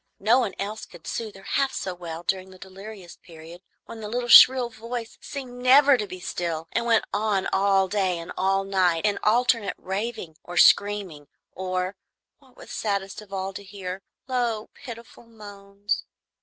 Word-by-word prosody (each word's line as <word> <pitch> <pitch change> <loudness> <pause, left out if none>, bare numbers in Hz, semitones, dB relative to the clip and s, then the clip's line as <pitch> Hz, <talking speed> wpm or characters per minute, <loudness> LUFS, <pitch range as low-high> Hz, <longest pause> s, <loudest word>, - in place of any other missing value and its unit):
No 225 +6 +4
one 235 -6 -2
else 210 +2 -5
could 175 - -15
soothe 220 -3 -5
her 195 - -13
half 275 +5 0
so 185 - -3
well 170 -1 -7
during 190 +1 -2
the 185 - -14
delirious 195 -1 -11
period, 165 +1 -13 0.2
when 230 - -10
the 210 - -5
little 240 +2 -2
shrill 250 0 +8
voice 230 +1 -6
seemed 250 -3 -8
never 275 +2 +7
to 215 -4 -3
be 185 -1 -8
still, 165 -2 -4
and 235 0 -1
went 230 -1 +3
on 205 -2 0
all 195 0 +3
day 190 -3 0
and 165 0 -8
all 195 +1 +1
night 185 -3 +1
in 205 -1 +1
alternate 230 -2 +2
raving 195 -4 -5
or 175 0 -8
screaming 185 -4 +3 0.2
or, 185 +1 -3 0.4
what 265 -3 -24
was - - -12
saddest 200 -1 -3
of 210 -2 -16
all 195 0 -3
to 200 - -8
hear, 190 -1 -7 0.3
low 240 -4 -1
pitiful 235 -2 -11
moans. 205 -2 -5
200 Hz, 170 wpm, -25 LUFS, 185-230 Hz, 0.4 s, shrill